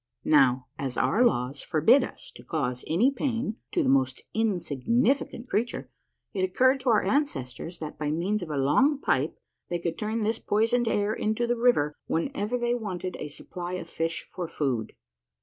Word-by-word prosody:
Now, 130 Hz, -, +4 dB
as 130 Hz, -3 st, -3 dB
our 240 Hz, -, +3 dB
laws 135 Hz, -, +1 dB
forbid 160 Hz, -, +4 dB
us -, -, -8 dB
to -, -, -13 dB
cause 125 Hz, -6 st, -2 dB
any 220 Hz, -, +3 dB
pain 245 Hz, -5 st, -2 dB
to -, -, +1 dB
the -, -, 0 dB
most 130 Hz, -1 st, +2 dB
insignificant 225 Hz, -, 0 dB
creature, 235 Hz, +2 st, -2 dB, 0.4 s
it 195 Hz, -, -1 dB
occurred 260 Hz, +8 st, +3 dB
to 255 Hz, -, -1 dB
our 220 Hz, -2 st, +4 dB
ancestors 175 Hz, -, -1 dB
that 155 Hz, -2 st, -7 dB
by 150 Hz, -1 st, -1 dB
means 185 Hz, +7 st, 0 dB
of 175 Hz, -, -6 dB
a 150 Hz, -, -2 dB
long 255 Hz, -, +3 dB
pipe -, -, 0 dB, 0.3 s
they 175 Hz, -, 0 dB
could 170 Hz, -1 st, -3 dB
turn 220 Hz, +2 st, -1 dB
this 220 Hz, +2 st, 0 dB
poisoned 230 Hz, +3 st, +1 dB
air 205 Hz, -1 st, +1 dB
into 220 Hz, +3 st, 0 dB
the 240 Hz, +1 st, +1 dB
river 230 Hz, -12 st, +3 dB
whenever 210 Hz, +5 st, -1 dB
they 240 Hz, 0 st, 0 dB
wanted 185 Hz, -6 st, -4 dB
a -, -, -4 dB
supply 175 Hz, +4 st, -7 dB
of 185 Hz, -2 st, -4 dB
fish 165 Hz, 0 st, -3 dB
for 180 Hz, -2 st, -5 dB
food. 130 Hz, -8 st, -2 dB
195 Hz, 175 wpm, -27 LUFS, 155-240 Hz, 0.4 s, Now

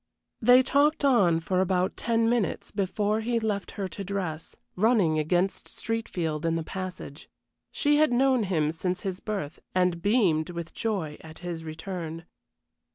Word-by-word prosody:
They 250 Hz, +3 st, +7 dB
talked 285 Hz, +2 st, +2 dB
on 195 Hz, -12 st, +4 dB
for 185 Hz, +2 st, +1 dB
about 185 Hz, 0 st, +1 dB
ten 230 Hz, 0 st, +1 dB
minutes 230 Hz, -6 st, 0 dB
before 205 Hz, +2 st, 0 dB
he 235 Hz, +1 st, 0 dB
left 210 Hz, -3 st, -2 dB
her 195 Hz, -2 st, -2 dB
to 200 Hz, -, -6 dB
dress, 180 Hz, -5 st, -4 dB, 0.2 s
running 195 Hz, -7 st, +3 dB
against 175 Hz, +5 st, 0 dB
Streatfield 175 Hz, -9 st, -3 dB
in 165 Hz, 0 st, +1 dB
the 165 Hz, -, -1 dB
passage. 180 Hz, -5 st, -7 dB, 0.4 s
She 295 Hz, 0 st, +2 dB
had 310 Hz, -3 st, +4 dB
known 260 Hz, 0 st, +3 dB
him 155 Hz, -5 st, +1 dB
since 180 Hz, +3 st, -2 dB
his 190 Hz, -1 st, -4 dB
birth, 195 Hz, -8 st, -4 dB, 0.2 s
and 180 Hz, -2 st, +2 dB
beamed 185 Hz, -7 st, +2 dB
with 170 Hz, -1 st, -6 dB
joy 190 Hz, -10 st, -2 dB
at 160 Hz, 0 st, -12 dB
his 170 Hz, -2 st, -4 dB
return. 165 Hz, 0 st, -6 dB
185 Hz, 155 wpm, -27 LUFS, 165-225 Hz, 0.4 s, They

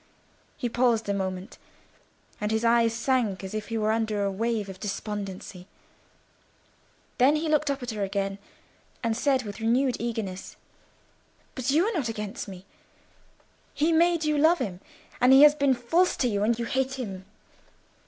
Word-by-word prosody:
He 245 Hz, -, -2 dB
paused 235 Hz, -2 st, +1 dB
a -, -, +2 dB
moment, 190 Hz, -1 st, -4 dB, 0.8 s
and 210 Hz, -, -1 dB
his 220 Hz, +1 st, 0 dB
eyes 230 Hz, 0 st, +4 dB
sank 230 Hz, -4 st, 0 dB
as 190 Hz, -, -6 dB
if 215 Hz, -1 st, -4 dB
he 230 Hz, -, -3 dB
were 215 Hz, 0 st, +1 dB
under 220 Hz, -2 st, 0 dB
a 200 Hz, -, 0 dB
wave 220 Hz, +1 st, -1 dB
of 190 Hz, -1 st, -9 dB
despondency. 195 Hz, -3 st, -6 dB, 1.5 s
Then 270 Hz, +4 st, +5 dB
he 315 Hz, +1 st, -1 dB
looked 305 Hz, -2 st, +2 dB
up 275 Hz, -2 st, -2 dB
at 245 Hz, -, -4 dB
her 215 Hz, -2 st, -5 dB
again, 195 Hz, 0 st, -2 dB, 0.6 s
and 230 Hz, -1 st, 0 dB
said 265 Hz, +1 st, +1 dB
with 205 Hz, 0 st, -7 dB
renewed 245 Hz, +3 st, +1 dB
eagerness—"But 225 Hz, +3 st, -8 dB
you 315 Hz, +7 st, +3 dB
are 455 Hz, -, -1 dB
not 285 Hz, -, -1 dB
against 215 Hz, +2 st, -5 dB
me. 190 Hz, -1 st, -10 dB, 1.1 s
He 310 Hz, +3 st, +2 dB
made 335 Hz, 0 st, +3 dB
you 300 Hz, -1 st, +1 dB
love 320 Hz, +4 st, +5 dB
him, 180 Hz, -, -4 dB, 0.4 s
and 250 Hz, +1 st, +6 dB
he 270 Hz, +2 st, +9 dB
has 295 Hz, 0 st, +8 dB
been 280 Hz, -3 st, +2 dB
false 325 Hz, +10 st, +1 dB
to 250 Hz, -, +1 dB
you; 205 Hz, -3 st, -1 dB
and 225 Hz, +2 st, +2 dB
you 235 Hz, -, -3 dB
hate 265 Hz, +2 st, -1 dB
him. 195 Hz, -8 st, -6 dB
230 Hz, 165 wpm, -26 LUFS, 205-265 Hz, 1.5 s, he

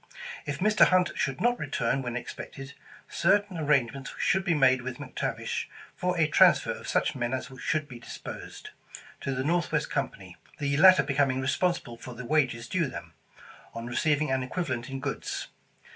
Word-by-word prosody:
If 145 Hz, -1 st, -2 dB
Mr. 210 Hz, +2 st, +5 dB
Hunt 185 Hz, -1 st, +3 dB
should 135 Hz, 0 st, -1 dB
not 240 Hz, +1 st, +2 dB
return 125 Hz, +4 st, -1 dB
when 120 Hz, -2 st, -3 dB
ex -, -, -6 dB
pected, 135 Hz, 0 st, -9 dB, 0.3 s
certain 195 Hz, +2 st, +2 dB
arrangements 135 Hz, -3 st, +1 dB
should 190 Hz, +1 st, +2 dB
be 175 Hz, -3 st, +1 dB
made 130 Hz, -3 st, +4 dB
with 125 Hz, +1 st, -6 dB
Mc 145 Hz, -3 st, -9 dB
Tavish -, -, -2 dB, 0.3 s
for 180 Hz, 0 st, -1 dB
a 160 Hz, -, +4 dB
transfer 150 Hz, -, +5 dB
of -, -, -7 dB
such -, -, +1 dB
men 120 Hz, 0 st, -1 dB
as 130 Hz, -, -6 dB
should 155 Hz, -2 st, 0 dB
be 125 Hz, -4 st, -10 dB
dis -, -, -9 dB
posed, -, -, -9 dB, 0.5 s
to 135 Hz, -1 st, -3 dB
the 130 Hz, -, -1 dB
Northwest 160 Hz, -1 st, 0 dB
Company, 95 Hz, -10 st, -4 dB, 0.2 s
the 140 Hz, -1 st, 0 dB
latter 185 Hz, +3 st, +8 dB
becoming 135 Hz, -2 st, +1 dB
responsible 130 Hz, -2 st, -1 dB
for 125 Hz, +1 st, -9 dB
the 125 Hz, +1 st, -7 dB
wages 125 Hz, -5 st, +1 dB
due 175 Hz, -5 st, 0 dB
them, 130 Hz, -, -8 dB, 0.6 s
on 115 Hz, 0 st, -5 dB
receiving 150 Hz, +4 st, +1 dB
an 130 Hz, 0 st, +1 dB
equivalent 130 Hz, -3 st, -3 dB
in 135 Hz, 0 st, -4 dB
goods. -, -, -4 dB
140 Hz, 175 wpm, -28 LUFS, 130-165 Hz, 0.6 s, latter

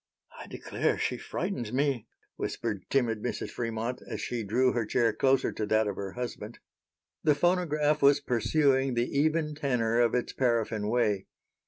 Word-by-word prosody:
"I -, -, -9 dB
declare -, -, -1 dB
she -, -, -1 dB
frightens 155 Hz, -, -3 dB
me," 130 Hz, -3 st, 0 dB, 0.3 s
whispered 105 Hz, -5 st, -4 dB
timid 115 Hz, -5 st, +1 dB
Mrs. 125 Hz, -, -3 dB
Fremont, 115 Hz, +1 st, -3 dB
as -, -, -4 dB
she 120 Hz, -2 st, -3 dB
drew 125 Hz, +5 st, +2 dB
her 120 Hz, -, 0 dB
chair 115 Hz, +1 st, +1 dB
closer 135 Hz, 0 st, +2 dB
to -, -, -4 dB
that 110 Hz, +1 st, +3 dB
of 100 Hz, -2 st, -2 dB
her 100 Hz, -1 st, -5 dB
husband. 120 Hz, -2 st, -6 dB, 0.7 s
The 150 Hz, -2 st, +4 dB
phonograph 155 Hz, -3 st, +1 dB
was 140 Hz, +1 st, +6 dB
pursuing 135 Hz, 0 st, +2 dB
the 120 Hz, 0 st, +2 dB
even 155 Hz, +1 st, +1 dB
tenor 125 Hz, -6 st, 0 dB
of 120 Hz, 0 st, +2 dB
its 125 Hz, -, -1 dB
paraffine 115 Hz, -4 st, 0 dB
way. 105 Hz, -4 st, +1 dB
125 Hz, 160 wpm, -29 LUFS, 115-140 Hz, 0.7 s, was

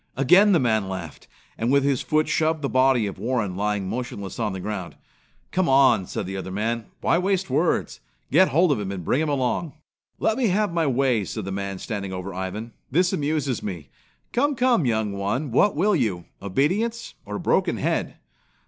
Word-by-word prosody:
Again 180 Hz, +10 st, +6 dB
the 175 Hz, -, +5 dB
man 110 Hz, -5 st, +1 dB
laughed, 85 Hz, -5 st, -7 dB, 0.3 s
and 115 Hz, +3 st, +1 dB
with 140 Hz, 0 st, +4 dB
his 140 Hz, -3 st, +1 dB
foot 155 Hz, 0 st, +1 dB
shoved 160 Hz, -1 st, 0 dB
the 140 Hz, -, 0 dB
body 130 Hz, -3 st, +3 dB
of 100 Hz, -1 st, -5 dB
Warren 110 Hz, -4 st, -1 dB
lying 105 Hz, -1 st, -1 dB
motionless 115 Hz, -2 st, -5 dB
on 110 Hz, -2 st, 0 dB
the 95 Hz, -, -5 dB
ground. 95 Hz, -2 st, -5 dB, 0.6 s
"Come 185 Hz, -3 st, +1 dB
on," 135 Hz, -8 st, +4 dB
said -, -, -4 dB
the 95 Hz, +1 st, -5 dB
other 95 Hz, -, -5 dB
man. 110 Hz, +4 st, -2 dB
"Why 170 Hz, -, +2 dB
waste 190 Hz, -4 st, 0 dB
words? 155 Hz, +6 st, 0 dB, 0.3 s
Get -, -, +6 dB
hold 165 Hz, +4 st, +3 dB
of 140 Hz, -, +1 dB
him 100 Hz, -2 st, -3 dB
and 90 Hz, -4 st, -6 dB
bring 140 Hz, -, +1 dB
him 160 Hz, -, 0 dB
along!" 140 Hz, +3 st, -1 dB, 0.4 s
"Let 220 Hz, -, 0 dB
me 245 Hz, -, +3 dB
have 205 Hz, -1 st, +1 dB
my 165 Hz, -3 st, +1 dB
way," 130 Hz, -4 st, +2 dB
said 105 Hz, +1 st, -5 dB
the 95 Hz, -, -4 dB
man 100 Hz, 0 st, -4 dB
standing 100 Hz, -2 st, -5 dB
over 90 Hz, +1 st, -5 dB
Ivan. 95 Hz, +5 st, -5 dB, 0.2 s
"This 180 Hz, +6 st, +2 dB
amuses 145 Hz, -4 st, -1 dB
me. 85 Hz, -9 st, -6 dB, 0.4 s
Come, 285 Hz, +4 st, +2 dB
come, 245 Hz, -, +2 dB
young 110 Hz, -3 st, 0 dB
one, 105 Hz, +8 st, -2 dB
what 190 Hz, -, +3 dB
will 200 Hz, +6 st, +2 dB
you 105 Hz, -, -1 dB, 0.2 s
obedience 185 Hz, -, -1 dB
or -, -, -6 dB
a -, -, -3 dB
broken -, -, +1 dB
head?" -, -, -1 dB
125 Hz, 195 wpm, -24 LUFS, 100-160 Hz, 0.6 s, Again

